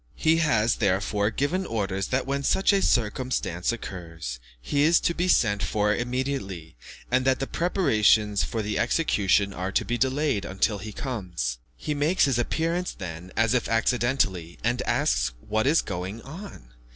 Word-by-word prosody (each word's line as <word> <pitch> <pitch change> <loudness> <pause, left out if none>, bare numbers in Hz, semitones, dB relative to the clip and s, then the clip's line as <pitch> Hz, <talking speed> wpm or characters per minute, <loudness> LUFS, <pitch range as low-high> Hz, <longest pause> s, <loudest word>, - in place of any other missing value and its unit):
He 160 +1 +3
has, 120 -9 +2
therefore, 100 +1 +1
given 145 - -1
orders 100 - -2
that 130 +1 0
when 140 +1 -1
such 190 +8 +3
a 195 - +3
circumstance 110 - 0
occurs, 85 - -6 0.2
he 65 - -1
is 160 +3 +5
to 170 - +1
be 175 +2 -1
sent 105 - +3
for 105 0 +1
immediately, 120 - -3 0.4
and 130 +1 +3
that 130 -1 +3
the 135 - -1
preparations 110 - +2
for 110 -2 -2
the 105 0 -2
execution 105 -6 +2
are 95 +1 -3
to - - +1
be 120 0 -2
delayed 135 -4 +1
until 100 +2 0
he 110 +1 -7
comes. 90 - -4 0.2
He 150 - -3
makes 150 +6 +2
his 130 -4 +1
appearance 165 +8 -1
then 90 -1 -8
as 115 +1 +3
if 125 - 0
accidentally, 115 -7 0
and 120 +2 0
asks 120 - +1
what 110 - -1
is 155 +4 +4
going 95 +4 -5
on. 155 - -10
115 Hz, 165 wpm, -26 LUFS, 95-140 Hz, 0.4 s, is